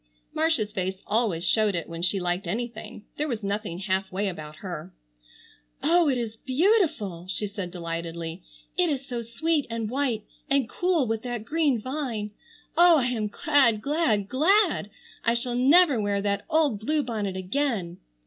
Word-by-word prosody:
Marcia's 310 -10 +1
face 190 -1 -3
always 210 -6 +1
showed 215 -3 +3
it 170 - -3
when 165 0 -6
she 185 +3 +1
liked 180 +1 -1
anything. 230 +1 -5
There 300 - 0
was 230 -6 -3
nothing 200 -3 -2
half 190 0 -1
way 195 +2 0
about 155 -4 -8
her. 180 0 -6 0.9
"Oh, 335 0 +4
it 260 - +1
is 225 -2 -4
beautiful!" 265 - +1
she 210 - -2
said 200 -3 -5
delightedly. 170 0 -5 0.3
"It 360 -2 +2
is 275 -2 -2
so 245 -3 -4
sweet 290 +7 -1
and 230 -1 -3
white 255 -5 0 0.3
and 275 -3 +2
cool 350 -3 +1
with 225 -1 -1
that 240 -3 -4
green 295 -3 +1
vine. 245 -4 -3 0.4
Oh, 345 0 +7
I 260 - +2
am 220 -4 -1
glad, 250 -1 +3
glad, 275 -10 +1
glad! 325 - +3 0.3
I 230 0 +2
shall 240 +1 0
never 275 +1 +5
wear 205 -1 0
that 200 0 -1
old 305 -9 +2
blue 295 +7 0
bonnet 210 -6 -3
again." 190 -3 -2
225 Hz, 165 wpm, -26 LUFS, 195-285 Hz, 0.9 s, Oh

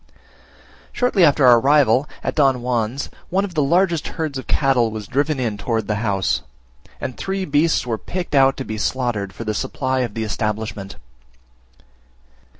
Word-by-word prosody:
Shortly 245 -7 +2
after 145 -3 +5
our 120 -2 +7
arrival 140 0 +3
at - - -1
Don 135 -4 +2
Juan's, 120 +1 -2 0.2
one 195 +2 +1
of 190 - -8
the 155 - +1
largest 170 +2 +2
herds 155 -5 -2
of - - -10
cattle 130 -5 +2
was 110 -1 -6
driven 140 +4 0
in 110 -5 -2
towards 115 +1 -1
the 105 - -1
house, 100 -4 0 0.6
and 130 - -5
three 190 0 -3
beasts 150 0 +2
were 115 -3 -2
picked 180 -2 -5
out 135 -1 +4
to 135 - -5
be 110 0 -5
slaughtered 115 -5 -1
for 115 - -8
the 110 -1 -2
supply 130 +5 -2
of 120 -5 -2
the 115 - -2
establishment. 105 -2 -3
130 Hz, 165 wpm, -20 LUFS, 110-150 Hz, 0.6 s, our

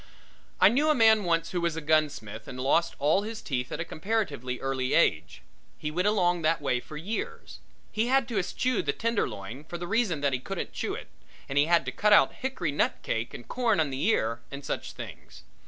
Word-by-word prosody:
I - - +8
knew 285 +7 +2
a 305 - +4
man 220 -3 +5
once 165 -1 +1
who 175 - -1
was 170 -2 0
a - - -2
gunsmith 145 -9 0
and 130 - -7
lost 165 +6 +2
all 155 +7 +3
his 220 +1 -5
teeth 125 -4 -3
at - - -4
a 165 - -2
comparatively 155 - -2
early 130 -1 -1
age. - - +1 0.3
He 150 - -4
went 180 +5 0
along 180 -4 +2
that 160 +1 +2
way 135 -4 0
for 150 +4 -10
years. 200 +9 -5 0.3
He 220 +2 0
had 265 -1 +3
to 220 -4 0
eschew 250 +6 0
the 140 - -1
tenderloin 145 - -2
for 175 +2 -7
the 175 - -5
reason 195 -6 0
that 140 -2 +1
he 130 - 0
couldn't - - -5
chew - - -2
it, - - -9 0.4
and 135 - -5
he 145 +1 +5
had 170 -4 +3
to 130 - -2
cut 210 +11 +3
out - - +6
hickory 245 - -3
nut 145 - +1
cake 115 +1 -2
and 120 - -10
corn 235 -6 +1
on 150 -3 +1
the 130 +1 -3
ear 115 - +1
and 140 0 -8
such - - -4
things. - - -10
165 Hz, 220 wpm, -28 LUFS, 135-210 Hz, 0.4 s, I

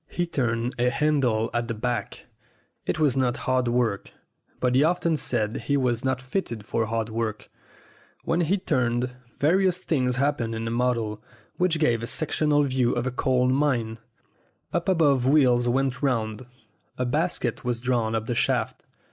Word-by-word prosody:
He 175 - -1
turned 120 -6 -1
a 125 +1 +3
handle 125 -5 +1
at 120 0 -1
the 115 - -3
back. 120 -1 -3 0.6
It - - 0
was 150 -5 +2
not 130 -2 +1
hard 130 -1 +1
work, 120 -4 0 0.5
but 125 -1 +1
he 130 +3 +4
often 170 0 +2
said 115 -6 -1
he 140 +3 +2
was 120 -3 0
not 130 -1 0
fitted 125 - -4
for 115 0 -1
hard 115 0 -2
work. 110 -1 -4 0.7
When 165 +2 +1
he 175 +4 +2
turned, 125 -8 0 0.3
various 180 +4 +3
things 130 -8 0
hap 140 +3 +1
pened 115 -1 -2
in 110 0 -4
the 115 - -2
model, 115 -3 -1 0.4
which 180 -2 +2
gave 120 -7 +2
a 115 - -4
sectional 150 0 +1
view 130 -3 +1
of 120 0 -1
a 130 - -1
coal 125 0 +1
mine. 130 -5 0 0.7
Up 175 +2 0
above 145 -8 +3
wheels 125 -4 +4
went 130 0 0
round. 115 -3 -1 0.5
A 125 - -1
basket 145 -3 -1
was 120 -1 -1
drawn 120 -3 0
up 110 0 -2
the 120 - -2
shaft. - - 0
125 Hz, 170 wpm, -25 LUFS, 115-145 Hz, 0.7 s, he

